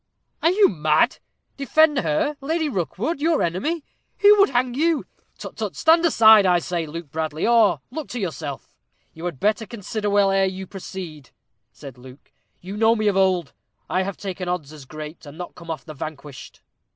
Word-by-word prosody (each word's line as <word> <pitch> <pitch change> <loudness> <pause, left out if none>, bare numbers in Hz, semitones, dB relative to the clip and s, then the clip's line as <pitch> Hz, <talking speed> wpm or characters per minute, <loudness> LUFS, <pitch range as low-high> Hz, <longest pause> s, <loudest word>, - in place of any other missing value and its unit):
"Are 325 - +4
you 395 +3 +5
mad? 155 +6 +1 0.4
Defend 295 +1 +3
her 200 - 0
Lady 315 +3 -1
Rookwood 225 - -3
your 325 0 +2
enemy 285 - -2 0.3
who 415 0 +7
would 395 - +6
hang 250 -1 0
you? 315 +3 +1 0.3
Tut, - - -9
tut! - - -4
Stand 330 +1 +4
aside, 220 -9 +7
I 180 -2 +4
say, 170 -1 -3
Luke 160 -1 -8
Bradley, 155 0 -2
or 215 - +4
look 310 +1 -6
to 245 - -5
yourself." 155 -7 -5 0.4
"You 160 +2 -9
had 170 -7 -4
better 215 +1 0
consider 215 -1 -4
well 200 -1 +3
ere 195 0 +3
you 190 0 -4
proceed," 180 -7 -9 0.4
said 135 -3 -12
Luke. 130 +2 -15 0.3
"You 195 +3 -7
know 225 +1 +4
me 215 -1 0
of 200 - -1
old. 185 -6 +1 0.4
I 185 - +2
have 195 0 -4
taken 185 -2 -5
odds 155 -5 -4
as 150 -3 -12
great, 155 +3 -9
and 145 +2 -11
not 180 - -7
come 170 -1 -13
off 155 -6 -5
the 155 - -8
vanquished." 145 -1 -9
190 Hz, 185 wpm, -22 LUFS, 160-245 Hz, 0.4 s, who